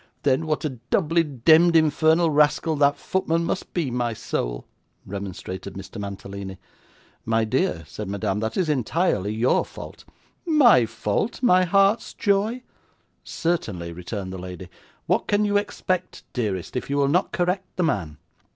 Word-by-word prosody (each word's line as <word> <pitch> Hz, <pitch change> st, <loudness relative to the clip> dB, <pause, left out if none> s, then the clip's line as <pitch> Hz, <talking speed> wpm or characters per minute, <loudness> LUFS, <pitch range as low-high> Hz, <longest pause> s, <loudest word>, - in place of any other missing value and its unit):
'Then 140 Hz, +3 st, +2 dB
what 155 Hz, 0 st, -1 dB
a 130 Hz, -5 st, -4 dB
doubly 165 Hz, -2 st, +2 dB
demd 160 Hz, +5 st, +4 dB
infernal 160 Hz, +1 st, +4 dB
rascal 150 Hz, +2 st, +3 dB
that 145 Hz, 0 st, +3 dB
footman 170 Hz, -2 st, -1 dB
must 185 Hz, -, -3 dB
be, 160 Hz, -8 st, -1 dB
my 120 Hz, -1 st, -1 dB
soul,' -, -, -3 dB, 0.4 s
remonstrated 95 Hz, -1 st, -6 dB
Mr. 100 Hz, +2 st, -8 dB
Mantalini. 100 Hz, -1 st, -7 dB, 0.7 s
'My 115 Hz, 0 st, +1 dB
dear,' 130 Hz, -, 0 dB
said 105 Hz, +6 st, -7 dB
Madame, 100 Hz, 0 st, -1 dB
'that 110 Hz, +1 st, -3 dB
is 185 Hz, -3 st, +1 dB
entirely 140 Hz, -, 0 dB
your 115 Hz, +4 st, +2 dB
fault.' -, -, -11 dB, 0.4 s
'My 260 Hz, -, +5 dB
fault, 115 Hz, -, -2 dB
my 185 Hz, -6 st, +5 dB
heart's 195 Hz, +4 st, +2 dB
joy?' 210 Hz, +5 st, +1 dB, 0.6 s
'Certainly,' 100 Hz, -, -2 dB
returned 95 Hz, +2 st, -6 dB
the 95 Hz, -, -6 dB
lady; 90 Hz, 0 st, -8 dB, 0.4 s
'what -, -, +1 dB
can 205 Hz, +1 st, +2 dB
you 205 Hz, 0 st, 0 dB
expect, 185 Hz, -3 st, -2 dB
dearest, 100 Hz, -7 st, -3 dB
if 125 Hz, -, -3 dB
you 140 Hz, -, 0 dB
will 140 Hz, -1 st, +3 dB
not 175 Hz, +7 st, +1 dB
correct 180 Hz, +1 st, -1 dB
the 180 Hz, -, 0 dB
man? 90 Hz, -, -1 dB
140 Hz, 150 wpm, -24 LUFS, -, 0.7 s, My